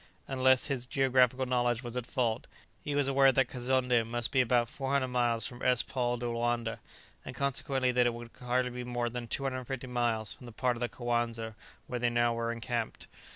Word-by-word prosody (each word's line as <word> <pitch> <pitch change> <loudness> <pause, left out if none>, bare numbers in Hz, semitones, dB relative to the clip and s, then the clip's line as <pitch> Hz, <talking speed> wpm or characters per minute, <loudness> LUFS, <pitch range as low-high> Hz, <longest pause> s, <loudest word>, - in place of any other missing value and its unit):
Unless 130 -1 +3
his 125 -3 -3
geographical 130 -1 +3
knowledge 120 -1 +1
was 120 0 -6
at 125 -2 -3
fault, 120 -2 -1 0.4
he 145 - -2
was 145 -1 +3
aware 135 0 +5
that 135 -1 +2
Kazonndé 125 -1 +1
must 120 +1 -2
be 135 -2 +4
about 120 -1 +2
400 135 +1 -1
miles 120 -3 +1
from 120 0 -7
S. 125 -2 +3
Paul 120 -2 -1
de 120 - -5
Loanda, 120 -1 -1 0.4
and 125 - -8
consequently 135 -1 0
that 125 0 +3
it 120 - 0
could 120 0 -9
hardly 125 +1 +1
be 125 0 -5
more 120 -1 -2
than 120 0 -5
250 130 0 -3
miles 120 -4 0
from 125 - -13
the - - -8
part 125 +2 0
of - - -7
the 120 0 -1
Coanza 120 -2 -2 0.3
where 125 - -4
they 120 - +2
were 120 - -6
now 115 -1 +2
encamped. 115 0 -3
125 Hz, 200 wpm, -31 LUFS, 120-130 Hz, 0.4 s, aware